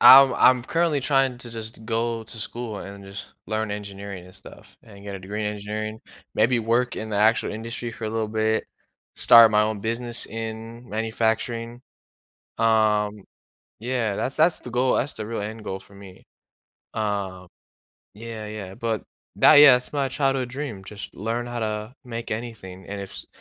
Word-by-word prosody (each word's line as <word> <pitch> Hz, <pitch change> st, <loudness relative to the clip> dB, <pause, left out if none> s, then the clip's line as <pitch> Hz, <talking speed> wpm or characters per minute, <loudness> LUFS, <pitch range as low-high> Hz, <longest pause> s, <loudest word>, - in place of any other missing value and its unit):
I'm 135 Hz, 0 st, +10 dB
I'm 125 Hz, -1 st, +5 dB
currently 165 Hz, -1 st, +1 dB
trying 135 Hz, -2 st, +2 dB
to 120 Hz, -1 st, -8 dB
just 110 Hz, -1 st, -7 dB
go 115 Hz, 0 st, -1 dB
to 115 Hz, -, -9 dB
school 115 Hz, -1 st, -5 dB
and 100 Hz, 0 st, -9 dB
just 100 Hz, +1 st, -8 dB
learn 110 Hz, 0 st, -1 dB
engineering 100 Hz, -2 st, -6 dB
and 90 Hz, -, -15 dB
stuff 100 Hz, -, -14 dB
and 100 Hz, -2 st, -14 dB
get 100 Hz, -1 st, -5 dB
a -, -, -5 dB
degree 105 Hz, +3 st, -4 dB
in 105 Hz, -, -1 dB
engineering, 110 Hz, +1 st, -5 dB, 0.3 s
maybe 115 Hz, +3 st, +3 dB
work 120 Hz, +2 st, +1 dB
in 110 Hz, -, -4 dB
the 105 Hz, -, -1 dB
actual 110 Hz, +2 st, +3 dB
industry 115 Hz, +2 st, -5 dB
for 115 Hz, -, -7 dB
a 110 Hz, -, -2 dB
little 110 Hz, -1 st, -1 dB
bit, 110 Hz, 0 st, +1 dB, 0.5 s
start 115 Hz, -1 st, +8 dB
my 105 Hz, 0 st, +4 dB
own 105 Hz, -1 st, -1 dB
business 115 Hz, +2 st, -2 dB
in 115 Hz, +2 st, -7 dB
manufacturing, 115 Hz, +2 st, -1 dB, 0.8 s
um, 105 Hz, -2 st, +2 dB, 0.6 s
yeah, 115 Hz, -3 st, -1 dB
that's 130 Hz, -, -2 dB
that's 160 Hz, +2 st, +3 dB
the 125 Hz, -, -9 dB
goal 125 Hz, +1 st, +2 dB
that's 135 Hz, +3 st, 0 dB
the 110 Hz, -, -6 dB
real 115 Hz, -2 st, -3 dB
end 110 Hz, +1 st, -6 dB
goal 95 Hz, -1 st, -4 dB
for 100 Hz, -, -18 dB
me. 95 Hz, -2 st, -13 dB, 0.7 s
Um, 100 Hz, -4 st, -2 dB, 0.7 s
yeah, 110 Hz, 0 st, -7 dB
yeah, 105 Hz, -3 st, -7 dB
but 115 Hz, 0 st, -2 dB, 0.3 s
that -, -, +7 dB
yeah, 145 Hz, -2 st, +10 dB
that's 125 Hz, 0 st, -2 dB
my 140 Hz, -2 st, +1 dB
childhood 135 Hz, -2 st, 0 dB
dream, 125 Hz, -8 st, -5 dB
just 105 Hz, +1 st, -8 dB
learn 115 Hz, +4 st, -2 dB
how 120 Hz, 0 st, -4 dB
to 110 Hz, +2 st, -3 dB
make 115 Hz, -1 st, -6 dB
anything 105 Hz, -5 st, -6 dB
and 100 Hz, 0 st, -5 dB
if 100 Hz, -, -7 dB
s -, -, -7 dB
110 Hz, 175 wpm, -24 LUFS, 105-120 Hz, 0.8 s, I'm